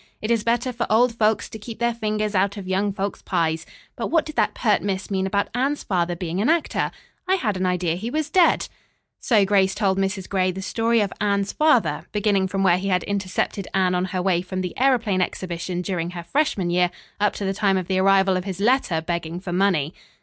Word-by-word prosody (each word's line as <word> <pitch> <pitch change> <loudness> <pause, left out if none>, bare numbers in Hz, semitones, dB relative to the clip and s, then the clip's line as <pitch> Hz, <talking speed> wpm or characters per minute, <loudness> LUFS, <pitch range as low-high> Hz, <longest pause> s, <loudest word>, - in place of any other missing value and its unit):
"It 215 - -2
is 230 -2 +2
better 240 +2 0
for 235 0 -2
old 235 +2 +4
folks 220 -2 +1
to 220 - -9
keep 220 +2 -8
their 235 0 +1
fingers 215 -2 -2
out 200 +1 +1
of 195 -2 -7
young 195 +2 0
folk's 195 0 -4
pies. 160 0 -1 0.3
But - - -3
what 325 -2 +2
did 310 - -8
that - - +1
pert 215 -4 +2
miss 195 0 -3
mean 190 -1 0
about 200 +1 0
Anne's 270 +4 0
father 175 -2 0
being 175 +2 -3
an 230 - +2
actor? 330 0 +1 0.4
I 380 - +3
had 220 - -1
an 185 0 0
idea 180 -2 0
he 200 +7 -4
was 305 +3 -1
dead." 360 -2 +4 0.5
So 215 -5 +3
Grace 190 -1 +2
told 195 -2 +1
Mrs. 195 -1 -2
Gray 185 -2 +1
the 190 +1 -6
story 230 +2 +1
of 200 -2 -1
Anne's 200 -1 +1
father, 245 - +2
beginning 205 -2 +2
from 195 +1 -1
where 180 -2 +4
he 195 - -3
had 180 -2 +1
intercepted 200 0 -2
Anne 185 -1 +2
on 180 0 +1
her 185 -1 -3
way 180 -2 +2
from 185 +1 -4
the 180 -1 -4
aëroplane 235 -7 +2
exhibition 180 0 -3
during 175 -3 -2
her 175 -1 -7
freshman 195 - 0
year, 180 0 +3 0.3
up 210 0 +2
to 200 - -4
the 195 - 0
time 195 -1 +2
of 185 - -2
the 185 +1 0
arrival 195 0 +4
of 185 0 -2
his 190 -2 -5
letter 210 -7 +2
begging 170 0 -3
for 180 -1 -5
money. 180 -5 +1
195 Hz, 225 wpm, -23 LUFS, 185-215 Hz, 0.5 s, old